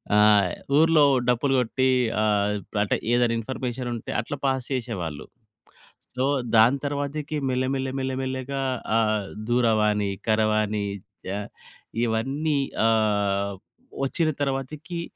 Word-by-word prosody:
ఆ! -, -, +5 dB, 0.6 s
ఊర్లో 160 Hz, -1 st, +5 dB, 0.2 s
డప్పు‌లు 125 Hz, +3 st, +2 dB
కొట్టి 130 Hz, +2 st, +1 dB, 0.3 s
ఆహ్, 105 Hz, -1 st, +2 dB, 0.3 s
అంటే 105 Hz, -, +1 dB, 0.2 s
ఏదైనా 120 Hz, -1 st, +3 dB
ఇన్‌ఫర్మేషన్ 125 Hz, +1 st, -4 dB
ఉంటే 115 Hz, -, -6 dB
అట్లా 140 Hz, +5 st, -6 dB
పాస్ 130 Hz, -2 st, 0 dB
చేసేవాళ్ళు. 90 Hz, -, -4 dB, 0.9 s
సో, 125 Hz, +1 st, -1 dB, 0.3 s
దాని 120 Hz, +5 st, +6 dB
తరువాతకి 145 Hz, +1 st, -3 dB
మెల్ల, 130 Hz, 0 st, 0 dB
మెల్ల, 135 Hz, 0 st, -2 dB
మెల్ల, 130 Hz, 0 st, -2 dB
మెల్లగా 130 Hz, +1 st, -3 dB, 0.4 s
ఆహ్, 110 Hz, -3 st, +1 dB, 0.2 s
దూరవాణి, 105 Hz, -4 st, +2 dB, 0.2 s
కరవాణి 110 Hz, -1 st, +1 dB, 0.4 s
చ -, -, -5 dB, 0.8 s
ఇవన్నీ 135 Hz, +7 st, 0 dB, 0.3 s
ఆహ్, 100 Hz, -3 st, +1 dB, 0.5 s
వచ్చిన 160 Hz, +4 st, 0 dB
తరువాతకి 145 Hz, +6 st, -3 dB
125 Hz, 105 wpm, -25 LUFS, 110-135 Hz, 0.9 s, దాని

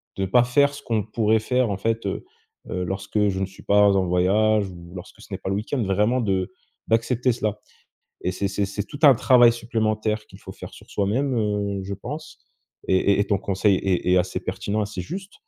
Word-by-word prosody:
de 95 Hz, -, -1 dB
pas 120 Hz, +6 st, +4 dB
faire 140 Hz, +3 st, +3 dB
ce -, -, -9 dB
qu'on 110 Hz, -3 st, -1 dB
pourrait 110 Hz, +1 st, +1 dB
faire 125 Hz, +1 st, +1 dB
en 100 Hz, -, -1 dB
fait. 115 Hz, +3 st, -1 dB
Heu, -, -, -3 dB, 0.5 s
heu, 90 Hz, -1 st, -2 dB
lorsque 100 Hz, +3 st, -1 dB
je 95 Hz, -1 st, -2 dB
ne 95 Hz, -, 0 dB
suis 95 Hz, 0 st, -14 dB
pas 105 Hz, 0 st, +5 dB
en 95 Hz, -1 st, +2 dB
voyage 100 Hz, +4 st, +2 dB
ou 85 Hz, 0 st, -12 dB
lorsque 95 Hz, +4 st, -11 dB
ce -, -, -14 dB
n'est 95 Hz, -, -3 dB
pas 95 Hz, -, -5 dB
le 95 Hz, -, 0 dB
week-end, 115 Hz, +5 st, -2 dB
vraiment 105 Hz, +6 st, +1 dB
de 95 Hz, -4 st, -1 dB, 0.4 s
d'accepter 120 Hz, +2 st, +1 dB
cela. 105 Hz, -2 st, -2 dB, 0.6 s
Et 90 Hz, -, -1 dB
c'est 100 Hz, +2 st, -2 dB
c'est 100 Hz, 0 st, -1 dB
c'est 100 Hz, +1 st, -4 dB
tout 145 Hz, -, -9 dB
un 140 Hz, -3 st, +8 dB
travail 120 Hz, 0 st, +6 dB
supplémentaire 110 Hz, -2 st, -1 dB
qu'il -, -, -15 dB
faut -, -, -10 dB
faire -, -, -10 dB
sur -, -, -15 dB
soi-même, 125 Hz, +7 st, 0 dB
heu, 105 Hz, -2 st, -1 dB
je 100 Hz, +1 st, -6 dB
pense. 145 Hz, +10 st, -9 dB, 0.4 s
Et 95 Hz, -, +3 dB
et 100 Hz, +1 st, +3 dB
et -, -, +3 dB
ton 100 Hz, -, +2 dB
conseil 100 Hz, 0 st, +1 dB
est 95 Hz, -2 st, -1 dB
est -, -, +5 dB
assez 90 Hz, +1 st, -1 dB
pertinent, 105 Hz, +1 st, -3 dB
assez 100 Hz, -2 st, -5 dB
juste. 190 Hz, -, -7 dB
105 Hz, 215 wpm, -23 LUFS, 95-115 Hz, 0.6 s, un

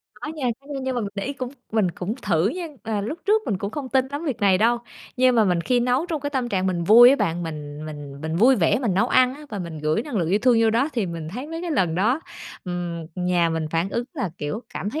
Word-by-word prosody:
Có -, -, -7 dB
nha, 275 Hz, -4 st, -2 dB
có 275 Hz, -, -23 dB
nha, 280 Hz, -2 st, -4 dB
nhưng 260 Hz, 0 st, -2 dB
mà 245 Hz, -, 0 dB
mình 205 Hz, -, -2 dB
để 200 Hz, -, -3 dB
ý 280 Hz, -, -2 dB
cũng 255 Hz, -3 st, -5 dB, 0.2 s
mình 215 Hz, -5 st, +2 dB
cũng 180 Hz, +5 st, -4 dB
thử 175 Hz, -1 st, +2 dB
nha. 345 Hz, +8 st, -4 dB, 0.2 s
À, 220 Hz, -3 st, -2 dB
lúc 230 Hz, +12 st, -4 dB
trước 430 Hz, +2 st, +3 dB
mình 195 Hz, -, -1 dB
cũng 200 Hz, +1 st, -3 dB
không 275 Hz, +1 st, -5 dB
tin 265 Hz, 0 st, +2 dB
lắm 285 Hz, +3 st, -4 dB
việc 275 Hz, -8 st, -2 dB
này 195 Hz, -2 st, +4 dB
đâu, 235 Hz, +3 st, +3 dB, 0.4 s
nhưng 255 Hz, 0 st, +4 dB
mà 225 Hz, -, +5 dB
mình 180 Hz, -3 st, +2 dB
khi 245 Hz, +8 st, +1 dB
nấu 250 Hz, +6 st, +1 dB
trong 325 Hz, -4 st, -3 dB
cái 285 Hz, +1 st, -3 dB
tâm 260 Hz, -4 st, -1 dB
trạng 190 Hz, -4 st, 0 dB
mình 175 Hz, -2 st, -1 dB
vui 235 Hz, +6 st, +9 dB
á, 275 Hz, -, +4 dB
bạn, 170 Hz, -7 st, -1 dB
mình 150 Hz, -2 st, -6 dB
mình 145 Hz, -2 st, -8 dB
mình 160 Hz, +1 st, -3 dB
vui 250 Hz, +8 st, +5 dB
vẻ 200 Hz, +2 st, +3 dB
mình 235 Hz, -8 st, 0 dB
nấu 220 Hz, +6 st, +2 dB
ăn 255 Hz, 0 st, +4 dB
á, 300 Hz, +2 st, -11 dB
và 205 Hz, -, -4 dB
mình 170 Hz, -4 st, -6 dB
gửi 155 Hz, +7 st, 0 dB
năng 275 Hz, -3 st, -5 dB
lượng 170 Hz, -5 st, 0 dB
yêu 195 Hz, +4 st, +3 dB
thương 250 Hz, -2 st, +5 dB
vô 225 Hz, -, +4 dB
đó 240 Hz, +6 st, +2 dB
thì 225 Hz, -6 st, -1 dB
mình 165 Hz, -2 st, -5 dB
thấy 245 Hz, -, -6 dB
mấy 325 Hz, +1 st, -5 dB
cái 345 Hz, -, -3 dB
lần 180 Hz, -, +1 dB
đó, 225 Hz, -, +2 dB, 0.4 s
ừm, 175 Hz, -2 st, -4 dB
nhà 180 Hz, -2 st, +1 dB
mình 160 Hz, -1 st, -2 dB
phản 165 Hz, +3 st, 0 dB
ứng 235 Hz, -, -1 dB
là, 255 Hz, -, -2 dB
kiểu, 150 Hz, +11 st, -4 dB
cảm 205 Hz, -, -3 dB
thấy 305 Hz, -, -3 dB
215 Hz, 290 wpm, -23 LUFS, 175-260 Hz, 0.4 s, vui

